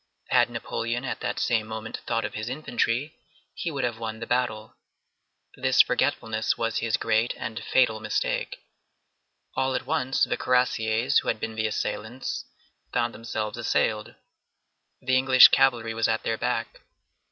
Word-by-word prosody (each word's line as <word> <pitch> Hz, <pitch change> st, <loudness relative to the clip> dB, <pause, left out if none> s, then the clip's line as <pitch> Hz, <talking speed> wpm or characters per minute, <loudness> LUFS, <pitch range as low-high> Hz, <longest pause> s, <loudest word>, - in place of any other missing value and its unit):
Had -, -, +4 dB
Napoleon 120 Hz, +3 st, -3 dB
at 130 Hz, -, -3 dB
that -, -, -3 dB
same 110 Hz, -2 st, +1 dB
moment 110 Hz, 0 st, -5 dB
thought 115 Hz, -1 st, 0 dB
of 105 Hz, -, -5 dB
his 110 Hz, +2 st, -4 dB
infantry, 130 Hz, +1 st, -1 dB, 0.4 s
he 170 Hz, -, -3 dB
would 140 Hz, -4 st, -3 dB
have 120 Hz, -2 st, -2 dB
won 110 Hz, -1 st, -5 dB
the 115 Hz, -, -5 dB
battle. 115 Hz, -3 st, -1 dB, 0.8 s
This -, -, +5 dB
forgetfulness 110 Hz, -1 st, 0 dB
was 115 Hz, -1 st, -1 dB
his 115 Hz, -2 st, 0 dB
great 115 Hz, +1 st, +1 dB
and 115 Hz, -2 st, -5 dB
fatal 115 Hz, -4 st, +2 dB
mistake. 110 Hz, -1 st, -2 dB, 0.9 s
All 130 Hz, 0 st, 0 dB
at -, -, -2 dB
once, 135 Hz, -3 st, 0 dB
the -, -, +1 dB
cuirassiers, 125 Hz, 0 st, +2 dB
who -, -, -8 dB
had -, -, 0 dB
been 110 Hz, -, -4 dB
the 110 Hz, 0 st, -1 dB
assailants, 110 Hz, +3 st, -4 dB, 0.5 s
found 120 Hz, +1 st, 0 dB
themselves 110 Hz, 0 st, -4 dB
assailed. 110 Hz, -2 st, 0 dB, 0.9 s
The 130 Hz, 0 st, +2 dB
English 130 Hz, 0 st, +8 dB
cavalry 115 Hz, -3 st, +3 dB
was 115 Hz, 0 st, +1 dB
at 110 Hz, 0 st, 0 dB
their 115 Hz, -, 0 dB
back. -, -, -3 dB
115 Hz, 150 wpm, -26 LUFS, 110-125 Hz, 0.9 s, English